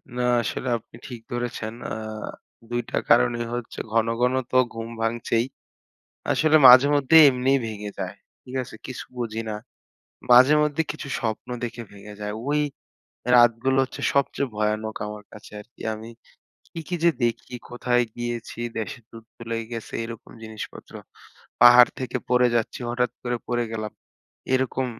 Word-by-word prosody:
না 125 - -1 0.2
আসলে 130 - -4
আপনি 115 - -17
ঠিক 120 -3 -8
ধরেছেন। 120 -2 -4 0.2
আ - - -2 0.8
২ 120 0 -1
টা - - -1
কারণই 120 - +3
হচ্ছে 120 -1 -5
ঘন, 115 0 +2
ঘন 125 +1 +3 0.2
তো 130 - +3 0.2
ঘুম 115 0 -6
ভাঙছেই। 115 +1 0 0.9
আসলে 155 0 +3
মাঝে 130 +3 +9
মধ্যে 145 +3 +3
এমনিই 130 +1 +2
ভেঙে 105 -1 -6
যায়। - - -4 0.3
ঠিক 130 +1 -9
আছে? - - -12
কিছু 130 - -7
বুঝি 115 -2 -3
না। 105 - -3 0.8
মাঝে 130 +4 +8
মধ্যে 150 +1 +1
কিছু 150 -1 -8
স্বপ্ন 110 +1 -3
দেখে 120 0 -4
ভেঙে 100 +1 -11
যায়। 105 0 -3
ওই 150 +1 +2 0.8
রাতগুলো 120 +2 +4
হচ্ছে - - -9
সবচেয়ে 140 -1 +1
ভয়ানক 110 +1 -1
আমার 105 0 -7
কাছে 105 - -13
আরকি। 120 - -15
আমি 110 +1 -9 0.7
কি, - - -5
কি 180 - -2
যে 170 - +7
দেখি! 120 +1 -2 0.2
কোথায় 120 0 +1
গিয়েছি? 120 -1 -5 0.2
দেশে 110 +2 -4
যুদ্ধ 115 0 -14 0.2
লাইগা 115 -1 -2
গেছে 115 -2 -6
এরকম 115 -1 -9
জিনিসপত্র। 110 -1 -9 0.7
পাহাড় 120 0 +9
থেকে 130 - -3
পড়ে 125 0 +4
যাচ্ছি 115 +2 -2
হঠাৎ 125 0 0
করে 120 -1 -1
পড়ে 120 -1 0
গেলাম। 110 -1 -4 0.6
এরকম 130 0 0
120 Hz, 150 wpm, -24 LUFS, 110-125 Hz, 0.9 s, মাঝে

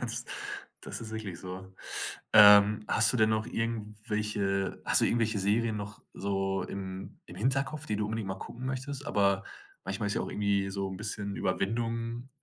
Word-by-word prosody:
Das - - -2 0.6
das - - -5
ist 110 -1 -7
wirklich 105 -6 -5
so. 95 +1 -8 0.6
Ähm, 105 0 +8
hast 110 +1 +5
du - - +1
denn 110 -1 +4
noch 110 +1 0
irgendwelche 105 -3 -2
hast - - +6
du - - +4
irgendwelche 115 -2 +1
Serien 110 +2 +1
noch 105 0 -6
so 95 -1 -1
im 95 -1 -7
im 90 - -11
Hinterkopf, 135 +7 0
die 105 - -1
du 105 - -1
unbedingt 110 -2 -3
mal 95 - -2
gucken 130 +2 -7
möchtest? 135 +2 -4
Aber 100 -1 +2 0.4
manchmal 95 +2 -2
ist 100 - -1
ja - - 0
auch - - -4
irgendwie 100 -1 0
so 95 0 -2
'n 95 - -6
bisschen 100 -1 -3
Überwindung 115 +5 -2
105 Hz, 175 wpm, -30 LUFS, 100-115 Hz, 0.6 s, Ähm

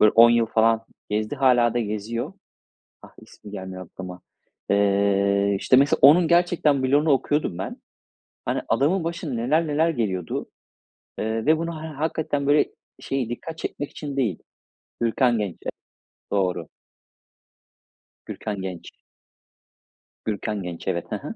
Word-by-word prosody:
böyle 105 - +6
10 115 +1 +8
yıl 120 -1 +3
falan 115 0 +2 0.3
gezdi, 110 +5 -1
hâlâ 120 -3 +4
da - - +2
geziyor. 110 +2 -3 0.7
Ah, - - -14
ismi 105 - -14
gelmiyor 95 -2 -7
aklıma. 90 0 -9 0.5
Eee, 100 0 +2
işte - - +4
mesela 140 +1 +4
onun 160 +5 +7
gerçekten 170 -5 +3
bloğunu 145 +4 +3
okuyordum 140 - +1
ben. 95 - -5 0.7
Hani, - - -1
adamın 150 +10 +2
başına 165 -4 -4
neler 150 +8 +1
neler 155 +3 +2
geliyordu, 95 - -2 0.7
eee, 110 +1 -2
ve 155 +1 +5
bunu 165 -1 -4
he - - -5
hakikaten 150 -1 -2
böyle 145 +1 +4 0.3
şey 130 -4 -2
dikkat 160 +7 -6
çekmek 145 - -5
için 140 -2 -6
değil, 110 -11 0 0.6
Gürkan 120 0 +2
Genç 100 -5 -3
evet - - -4 0.6
doğru. 90 -5 0 1.6
Gürkan 105 -3 -5
Genç. 90 -3 -6 1.4
Gürkan 105 -2 -2
Genç, 85 -1 -7
evet. - - -1
Hı - - 0
hı. - - -6
115 Hz, 135 wpm, -24 LUFS, 100-145 Hz, 1.6 s, 10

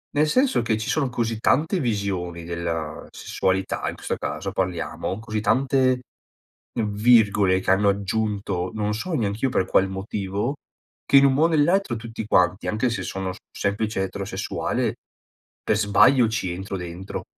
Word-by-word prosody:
nel 150 +1 +3
senso 255 - +2
che 115 -2 0
ci 110 - -4
sono 140 -4 +1
così 115 -2 -2
tante 160 - +2
visioni 100 - -2
della 85 -2 -4
sessualità 95 0 -1
in - - -6
questo - - -3
caso, - - -4
parliamo, 95 +1 -3
così 110 -1 -3
tante 130 +1 +2 0.7
virgole 105 -3 +3
che 95 - -4
hanno 100 +2 +4
aggiunto, 100 -2 -1
non 105 -1 -1
so 170 +11 -4
neanch'io 115 -1 0
per 95 - +1
qual 95 +1 +2
motivo, 100 +5 -3 0.5
che 140 - +5
in 135 - +7
un 135 - +4
mo 145 +4 +2
o - - +6
nell'altro 165 -1 +2
tutti 115 -1 -6
quanti, 90 -2 +2
anche 110 +4 +1
se 120 - -3
sono 95 -1 -3 0.2
semplice 100 0 -1
eterosessuale, 100 +1 -2 0.7
per 105 - +1
sbaglio 115 +4 +5
ci 100 -5 -2
entro 95 +2 -5
dentro 90 +1 -6
105 Hz, 150 wpm, -24 LUFS, 95-125 Hz, 0.7 s, in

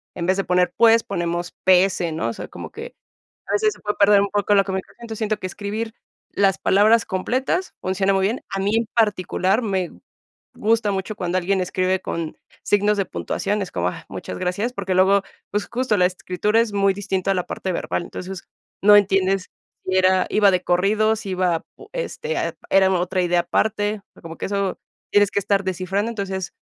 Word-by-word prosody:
en 170 - -3
vez 190 +1 +2
de 195 - 0
poner, 180 0 +2
pues, 230 0 +6
ponemos 175 -2 -3
P 185 0 +6
S, 175 -3 -2
¿no? 155 -7 -2
O - - -3
sea, - - -7
como - - -8
que 465 +2 -9 0.5
a - - -2
veces 430 0 +2
se - - -19
puede 210 0 -3
perder 200 0 +6
un 200 - 0
poco 205 0 +2
lo 195 - +5
que 195 - -4
me 190 - 0 0.2
siento, 230 -2 -7
siento 215 -1 -1
que 185 - -4
escribir 215 +4 -5 0.4
las 195 -1 +2
palabras 215 +4 +4
completas 260 - -1
funciona 190 +1 +1
muy 190 - +2
bien. 230 +6 -2
A - - -3
mí 205 +3 +1
en 230 0 +1
particular 205 -1 +1
me 190 -5 -1 0.6
gusta 220 -1 +1
mucho 195 +2 -3
cuando 180 -2 -1
alguien 190 +2 0
escribe 185 +1 0
con 165 -2 -4 0.3
signos 205 +1 +2
de 195 - +2
puntuación, 205 +3 -2
es 190 - -6
como, 90 0 0
ah, - - -7
muchas 90 - -6
gracias, 200 - -1
porque 195 -5 -3
luego, 190 +2 +4 0.3
pues 205 0 -2
justo 240 -2 0
la 180 -2 +4
escritura 185 +4 0
es 230 -2 0
muy 200 -1 +2
distinta 195 -1 -1
a - - 0
la 180 -1 -2
parte 190 - -3
verbal. 170 - -2
Entonces, 185 0 -7 0.4
no 205 +1 +7
entiendes 195 -1 +2 0.3
si 185 - -1
era 185 0 +4
iba 205 -2 +5
de 180 -1 +1
corrido, 210 +5 +2
si 210 -2 -7
iba 180 -3 0
pu 415 +1 -15
este, 485 -1 -4 0.3
era 190 -1 +5
otra 185 +1 0
idea 175 0 +2
aparte, 205 +4 0 0.2
como 165 -1 -9
que - - -3
eso 200 -1 -1 0.3
tienes 205 -1 +4
que - - 0
estar 200 0 +1
descifrando. 190 +4 -1
Entonces, 195 -4 -4
195 Hz, 200 wpm, -22 LUFS, 185-210 Hz, 0.6 s, no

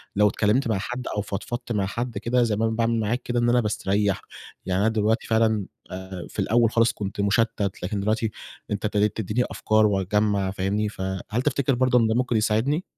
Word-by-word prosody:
لو 105 +1 +5
اتكلّمت 110 +5 +1
مع 110 -3 +1
حد 125 +5 -5
أو 105 - 0
فضفضت 115 +5 -5
مع 105 -4 +1
حد 115 +3 -4
كده 120 +4 +1
زي 110 -3 +1
ما 110 +2 0
أنا 110 0 0
باعمل 115 0 +1
معاك 115 +4 -1
كده 120 0 -1
إن 120 0 +2
أنا 125 - +4
باستريّح، 100 -2 0 0.4
يعني 95 +1 0
أنا 110 - +3
دلوقتي 110 +1 0
فعلًا 110 -2 +2 0.3
آآ، 95 -1 -7
في - - -8
الأول 115 0 +3
خالص 115 0 +3
كنت 100 -1 -4
مُشتَّت 105 -1 0
لكن 100 +3 -2
دلوقتي 110 +2 0 0.4
أنت 105 +1 -2
ابتديت 105 -1 +1
تدّيني 110 +3 0
أفكار 110 0 +2
وأجمّع 100 0 +1
فاهمني، 100 +2 -1
فهل 95 +3 -3
تفتكِر 140 -1 +1
برضه 125 0 +3
إن 115 - +3
ده 110 - +1
ممكن 125 -2 +1
يساعدني؟ 115 +10 +1
110 Hz, 200 wpm, -24 LUFS, 100-120 Hz, 0.4 s, لو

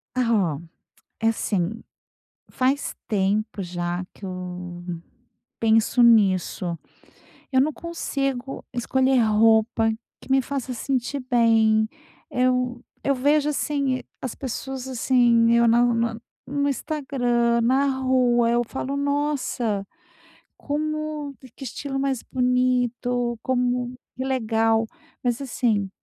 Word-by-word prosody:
Ah 215 - +2
oh, - - -10 0.6
é 225 - +3
assim, 220 -1 -1 0.7
faz 270 +2 0
tempo 205 0 0
já 175 0 -3
que - - -19
eu 180 -1 -6 0.8
penso 225 +2 +3
nisso, 185 -6 +3 0.8
eu 260 - +4
não 295 +4 +3
consigo 275 -6 -3
escolher 260 +2 +2
roupa 220 +1 +3 0.3
que - - -16
me 270 0 +5
faça 265 -1 -4
sentir 265 +2 -2
bem. 225 -2 +4 0.4
Eu 250 -1 +1 0.2
eu 275 - +3
vejo, 290 +3 +2
assim, 280 -3 -1 0.2
as 255 - -4
pessoas, 265 0 -5
assim, 240 -2 +3
eu 235 0 +5
na 240 +1 +5
no 230 -1 +1 0.3
no 285 +1 0
Instagram, 245 -5 0
na 260 +4 +3
rua, 250 -2 +3
eu 240 0 +2
falo: 265 +3 -4
"Nossa, 280 -7 -1 0.7
como 305 -1 -3 0.2
que - - -10
estilo 270 +2 -4
mais 270 -3 -1
bonito, 250 -1 0
como 250 -1 0 0.2
que 260 - -2
legal". 225 -3 +1 0.4
Mas 240 -1 0
assim, 225 -6 0
245 Hz, 110 wpm, -24 LUFS, 225-265 Hz, 0.8 s, me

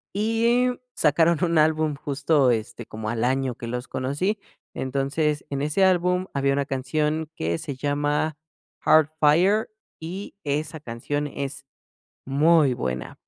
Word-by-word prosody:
Y 230 +4 +2 0.3
sacaron 165 +2 +3
un 170 -1 +2
álbum 155 -1 +2
justo, 140 0 +1
este, 115 0 -3
como 110 0 -5
al 115 0 -1
año 130 0 0
que 120 - -7
los 125 +2 -4
conocí. 145 +11 -1 0.3
Entonces, 140 +3 -1
en 140 -1 -3
ese 150 +7 +1
álbum 180 0 +2
había 140 0 +1
una 140 0 0
canción 150 +4 -1
que 85 - -1
se 140 - -5
llama 145 +2 0 0.5
"Heart 155 -1 +5
Fire" 180 +9 +4 0.3
y 180 +6 -7
esa 150 +2 -2
canción 145 +3 -3
es 140 -1 -6 0.6
muy 145 0 +4
buena, 65 - -4
145 Hz, 135 wpm, -24 LUFS, 135-160 Hz, 0.6 s, Heart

